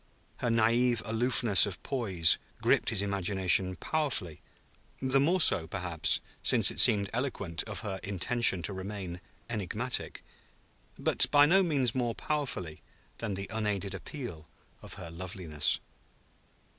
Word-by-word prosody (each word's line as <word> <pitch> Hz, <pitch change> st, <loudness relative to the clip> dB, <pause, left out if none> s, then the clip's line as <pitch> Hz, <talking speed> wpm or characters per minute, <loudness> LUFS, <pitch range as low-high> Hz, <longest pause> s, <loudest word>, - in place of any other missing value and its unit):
Her 125 Hz, -, -3 dB
naïve 115 Hz, +2 st, +2 dB
aloofness 115 Hz, -3 st, +3 dB
of 95 Hz, -3 st, -6 dB
poise 95 Hz, -, +2 dB, 0.2 s
gripped -, -, +2 dB
his 100 Hz, -, +2 dB
imagination 95 Hz, -2 st, +1 dB
powerfully, 135 Hz, -, -3 dB, 0.6 s
the 130 Hz, +1 st, +2 dB
more 170 Hz, +7 st, +2 dB
so, 80 Hz, -, +5 dB
perhaps, 90 Hz, -4 st, -1 dB, 0.2 s
since -, -, +5 dB
it -, -, -5 dB
seemed 100 Hz, -2 st, +5 dB
eloquent 110 Hz, -9 st, -3 dB
of 110 Hz, -3 st, -6 dB
her 100 Hz, -4 st, -5 dB
intention 100 Hz, 0 st, +2 dB
to 100 Hz, -, -3 dB
remain 95 Hz, -2 st, -7 dB, 0.3 s
enigmatic, 115 Hz, +3 st, -3 dB, 0.7 s
but -, -, +1 dB
by 145 Hz, 0 st, +5 dB
no 190 Hz, +6 st, +4 dB
means 140 Hz, -10 st, 0 dB
more 120 Hz, -3 st, -2 dB
powerfully 125 Hz, -, -4 dB, 0.4 s
than 105 Hz, -4 st, -4 dB
the 100 Hz, +1 st, -5 dB
unaided 105 Hz, -3 st, -2 dB
appeal 120 Hz, -, -8 dB, 0.3 s
of -, -, -10 dB
her 85 Hz, -, -9 dB
loveliness. 85 Hz, -4 st, -2 dB
105 Hz, 130 wpm, -29 LUFS, 90-125 Hz, 0.7 s, so